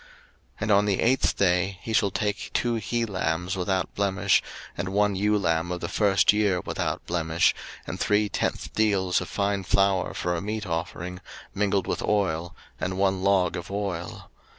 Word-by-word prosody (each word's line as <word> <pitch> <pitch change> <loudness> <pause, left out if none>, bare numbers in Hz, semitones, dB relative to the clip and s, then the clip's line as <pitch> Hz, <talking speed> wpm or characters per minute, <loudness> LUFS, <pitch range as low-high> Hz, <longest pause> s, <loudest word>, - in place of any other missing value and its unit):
03:014:010 - - -22 0.5
And 110 0 0
on 100 0 +5
the 100 -2 +1
eighth 130 +3 +2
day 90 0 +2
he 115 - -4
shall 105 -2 +3
take 105 +1 -2
two 120 -1 +1
he 115 +1 -1
lambs 90 -3 -2
without 95 0 -1
blemish, 100 -1 +2 0.3
and 95 +2 -3
one 100 +1 +2
ewe 105 +2 +2
lamb 85 -2 0
of 90 - -3
the 85 - -4
first 100 +1 +3
year 105 -3 +2
without - - -3
blemish, 85 0 +2 0.3
and - - -6
three 105 0 +2
tenth - - -2
deals 100 -5 +2
of 90 - -6
fine 100 0 0
flour 95 -1 +1
for 90 - -1
a 85 - -2
meat 105 +1 -3
offering, 90 +1 -4 0.3
mingled 100 -1 +1
with - - -2
oil, 85 -5 0 0.2
and 95 0 -2
one 95 -1 +1
log 95 -3 +2
of 85 -1 -6
oil. 100 -4 -4
95 Hz, 175 wpm, -26 LUFS, 90-105 Hz, 0.5 s, on